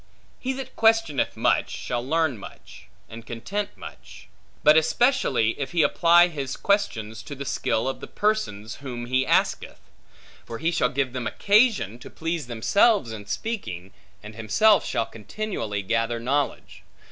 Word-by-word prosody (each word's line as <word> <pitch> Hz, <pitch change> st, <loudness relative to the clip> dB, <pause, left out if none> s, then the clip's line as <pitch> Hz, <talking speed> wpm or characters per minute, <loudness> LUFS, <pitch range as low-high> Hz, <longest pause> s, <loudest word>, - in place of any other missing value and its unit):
He 260 Hz, -, -2 dB
that 265 Hz, -1 st, -8 dB
questioneth 225 Hz, -, +2 dB
much, -, -, +2 dB
shall 120 Hz, -1 st, -4 dB
learn 160 Hz, 0 st, +1 dB
much, -, -, -13 dB, 0.2 s
and 115 Hz, +1 st, -10 dB
content 195 Hz, -, -5 dB
much; -, -, -12 dB, 0.3 s
but 150 Hz, 0 st, +7 dB
especially, 160 Hz, -, +2 dB
if 140 Hz, +3 st, -4 dB
he 170 Hz, -3 st, +3 dB
apply 175 Hz, 0 st, +5 dB
his 140 Hz, -6 st, -5 dB
questions 115 Hz, -, -1 dB
to 145 Hz, -, -8 dB
the 140 Hz, +1 st, -7 dB
skill 115 Hz, -1 st, -1 dB
of 135 Hz, -, -3 dB
the -, -, -8 dB
persons 205 Hz, -, -2 dB
whom 125 Hz, -4 st, -6 dB
he 130 Hz, +2 st, 0 dB
asketh; -, -, 0 dB, 0.6 s
for 115 Hz, -, -7 dB
he 165 Hz, +7 st, 0 dB
shall 125 Hz, -7 st, +1 dB
give 135 Hz, -1 st, -1 dB
them 125 Hz, -3 st, -3 dB
occasion, 205 Hz, -, +2 dB
to -, -, -11 dB
please 165 Hz, -4 st, -4 dB
themselves 130 Hz, -, +2 dB
in 105 Hz, -2 st, -8 dB
speaking, 105 Hz, -, -5 dB, 0.3 s
and 105 Hz, +1 st, -9 dB
himself 115 Hz, -, +3 dB
shall 115 Hz, -, -1 dB
continually 110 Hz, -, -5 dB
gather 115 Hz, +3 st, 0 dB
knowledge. 140 Hz, +4 st, -2 dB
135 Hz, 150 wpm, -24 LUFS, -, 0.6 s, but